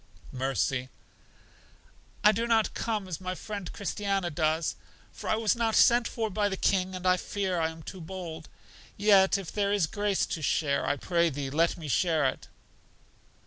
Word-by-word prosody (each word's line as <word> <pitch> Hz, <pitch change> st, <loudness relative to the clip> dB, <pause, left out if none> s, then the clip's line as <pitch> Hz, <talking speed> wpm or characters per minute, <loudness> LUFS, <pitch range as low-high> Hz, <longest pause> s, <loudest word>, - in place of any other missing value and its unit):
Mercy: 130 Hz, 0 st, -1 dB, 1.3 s
I 210 Hz, -, +8 dB
do 230 Hz, +3 st, -1 dB
not 225 Hz, -2 st, +2 dB
come 215 Hz, -4 st, -2 dB
as 180 Hz, -1 st, -5 dB
my 185 Hz, 0 st, -3 dB
friend 200 Hz, -1 st, -6 dB
Christiana 195 Hz, -3 st, -2 dB
does, 155 Hz, +1 st, 0 dB, 0.4 s
for -, -, -7 dB
I -, -, +3 dB
was 220 Hz, 0 st, +1 dB
not 230 Hz, -2 st, 0 dB
sent 240 Hz, 0 st, +5 dB
for 220 Hz, -2 st, -3 dB
by 205 Hz, +1 st, +1 dB
the 190 Hz, -, -3 dB
King, 185 Hz, -1 st, +1 dB
and 185 Hz, 0 st, -7 dB
I 185 Hz, 0 st, +4 dB
fear 190 Hz, -2 st, -2 dB
I 160 Hz, 0 st, +1 dB
am 160 Hz, 0 st, -11 dB
too 185 Hz, +2 st, -8 dB
bold. 165 Hz, -2 st, -7 dB, 0.5 s
Yet 200 Hz, -1 st, +5 dB
if 195 Hz, -4 st, -7 dB
there 200 Hz, -1 st, 0 dB
is 205 Hz, -4 st, +2 dB
grace 205 Hz, +3 st, 0 dB
to 160 Hz, -, -4 dB
share, 140 Hz, -1 st, 0 dB
I 145 Hz, -, +2 dB
pray 170 Hz, +4 st, +1 dB
Thee 140 Hz, -2 st, -4 dB
let 165 Hz, +4 st, +2 dB
me 160 Hz, -3 st, -7 dB
share 160 Hz, 0 st, +2 dB
it. 130 Hz, -, -2 dB
185 Hz, 180 wpm, -28 LUFS, 160-205 Hz, 1.3 s, I